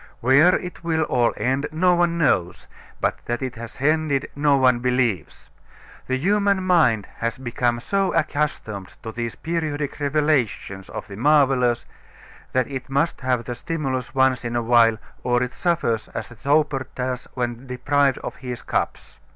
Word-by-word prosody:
Where 140 +9 +5
it 180 -1 -6
will 160 -1 +1
all 120 -5 +2
end 135 +3 0
no 180 +3 +3
one 170 -1 +2
knows, 90 - +1 0.3
but - - -1
that 120 +2 -2
it 130 -2 -3
has 115 0 -8
ended 150 -1 +1
no 145 -1 +3
one 130 -2 +4
believes. 125 - -1 0.6
The 130 - 0
human 200 +4 +2
mind 155 - +3
has 115 +3 -2
become 120 -1 -1
so 195 +9 0
accustomed 145 - -2
to 110 - -5
these 115 0 -4
periodic 155 -4 -3
revelations 140 -10 0
of - - -7
the 100 -2 -9
marvelous 130 -3 +3 0.7
that 130 -1 +2
it 130 0 -6
must 140 +4 0
have 125 -2 0
the 120 - -4
stimulus 130 -1 -3
once 130 -1 +3
in 120 0 -3
a 120 - 0
while 115 -1 +5 0.2
or 120 0 +1
it 125 0 -4
suffers 165 -11 0
as - - -4
the 120 - -12
toper 140 +1 +1
does 125 0 -3
when 120 0 -3
deprived 140 +1 +1
of - - -6
his 125 -3 -6
cups. - - -3
130 Hz, 160 wpm, -23 LUFS, 120-150 Hz, 0.7 s, Where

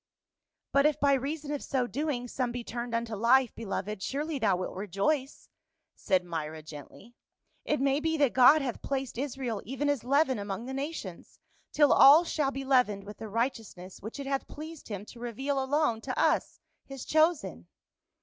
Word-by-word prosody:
" - - -60
But 280 +1 +5
if 300 -1 -1
by 280 -1 +4
reason 285 +3 -2
of 290 - -3
so 260 -3 0
doing, 260 -1 -3
some 250 0 -2
be 245 0 -5
turned 235 0 -4
unto 230 -1 -2
life, 240 +3 +3
beloved, 210 -2 -4
surely 295 +6 -3
thou 205 -5 +2
wilt 185 - -4
rejoice," 210 - -2 0.5
said 185 -3 0
Myra 160 -2 -5
gently.. 155 - -12 0.3
" - - -45
It 300 - +2
may 275 +1 +2
be 320 +1 0
that 285 -4 +2
God 275 +4 +6
hath 250 -4 -4
placed 270 -3 -3
Israel 255 -5 -3
even 270 +6 -2
as 285 -6 0
leaven 270 -1 +2
among 200 +3 -5
the 265 - -6
nations, 270 - -6 0.3
till 295 -2 +5
all 295 +5 +8
shall 300 -4 0
be 270 0 -5
leavened 250 -7 +2
with 205 +1 -10
the 220 - -7
righteousness 220 -5 -4
which 220 +7 -7
it 280 - -5
hath 275 0 -2
pleased 315 +1 -9
him 205 -2 -6
to 235 - -13
reveal 265 +4 -2
alone 265 -4 +1
to - - -5
us, - - +1 0.3
his 270 -2 -8
chosen." 305 - +1
260 Hz, 185 wpm, -29 LUFS, 215-285 Hz, 0.5 s, all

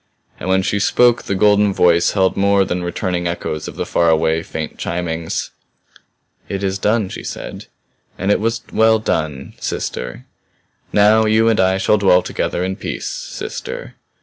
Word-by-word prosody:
And - - -4
when 95 0 +3
she 100 - 0
spoke 120 +4 +3
the 100 - -3
golden 105 0 +3
voice 85 -1 +3
held 95 -2 +2
more 100 0 +3
than 90 0 -2
returning 90 0 -2
echoes 80 -3 -4
of - - -8
the - - -3
far 85 -1 +2
away, 80 0 +2
faint 80 -1 -6
chimings. 85 -1 -3 1.0
"It 100 0 -3
is 95 0 -1
done," 105 0 +1
she - - -7
said. - - -7 0.5
"And 95 +2 0
it - - +3
was 115 +2 -1
well 110 0 +4
done 80 -10 -3
sister. 60 -1 -4 0.7
Now 110 +2 +5
you 110 +1 +3
and 115 -1 +2
I 95 0 +3
shall 105 +2 +2
dwell 90 -2 +4
together 90 - -2
in 95 +1 -3
peace - - -4
sister. - - -6
95 Hz, 165 wpm, -18 LUFS, 85-105 Hz, 1.0 s, Now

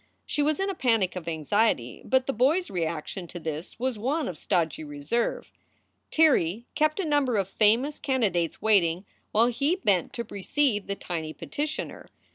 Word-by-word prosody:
She 295 - -1
was 300 +3 +1
in 390 - 0
a 390 - -1
panic 225 - +1
of 180 -3 -6
anxiety, 160 - 0
but 260 0 +2
the 270 - -1
boy 260 +9 +4
s 370 - -4
reaction 170 0 -3
to 175 - -8
this 160 +1 -5
was 250 -2 -2
one 285 +8 0
of 180 - -4
stodgy 165 -1 -1
reserve. 145 +11 -2 0.6
Tirrey 235 - +3
kept 310 +3 +1
a 385 - 0
number 290 -5 +2
of 195 -3 +1
famous 230 +9 +2
candidates 200 - 0
waiting 185 -4 +3 0.3
while 225 +2 +4
he 275 +8 +1
bent 200 - +1
to 235 - -3
receive 210 +1 0
the 200 - -2
tiny 160 -5 -5
petitioner. 300 - -4
215 Hz, 170 wpm, -27 LUFS, 175-275 Hz, 0.6 s, boy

